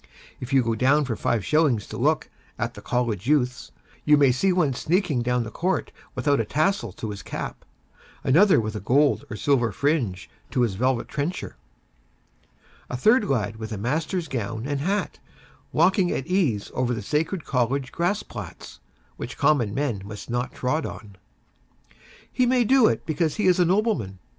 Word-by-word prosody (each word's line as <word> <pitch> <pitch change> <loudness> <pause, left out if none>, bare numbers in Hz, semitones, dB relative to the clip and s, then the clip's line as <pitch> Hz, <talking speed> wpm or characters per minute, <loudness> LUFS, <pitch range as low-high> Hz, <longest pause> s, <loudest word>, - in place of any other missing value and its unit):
If 125 - -7
you 135 -2 +4
go 115 0 0
down 135 +6 +3
for 120 -4 -2
five 110 -2 -1
shillings 150 -9 +2
to - - -9
look - - 0 0.3
at - - -2
the - - -11
'College 120 -4 -1
Youths,' 125 - +1 0.3
you 150 0 +5
may 140 -3 +5
see 185 +10 +2
one 165 -7 +2
sneaking 160 -1 0
down 125 0 0
the 110 - -7
court 185 - -1 0.2
without 145 -3 +1
a - - +2
tassel 155 - 0
to 110 +1 -5
his 100 - -7
cap; - - -6 0.6
another 175 +7 +5
with 110 -1 -3
a - - -2
gold 140 +8 +2
or - - -5
silver 120 -1 +1
fringe 120 - -1 0.2
to 130 - 0
his 115 -5 +1
velvet 120 +4 0
trencher; 150 +5 -4 1.3
a 125 - -3
third 220 - +4
lad 110 -5 -1
with 110 0 -7
a 110 - -3
master's 155 - -2
gown 115 -2 -4
and 140 0 -2
hat, 195 +5 -1 0.5
walking 180 +2 +3
at 135 - -2
ease 160 - 0
over 125 -1 0
the 110 - -5
sacred 155 - -1
College 130 +1 0
grass 180 +5 0
plats, - - -9 0.4
which 120 - -7
common 140 -8 +2
men 120 -4 -2
must 105 +3 -8
not 120 +1 -1
tread 145 +5 -1
on. 105 -7 -8 1.2
He 250 - +2
may 250 0 +3
do 255 0 +5
it - - -1
because 155 -1 0
he 210 - -1
is 185 -1 +4
a 180 - +5
nobleman. 185 - 0
135 Hz, 175 wpm, -24 LUFS, 115-165 Hz, 1.3 s, you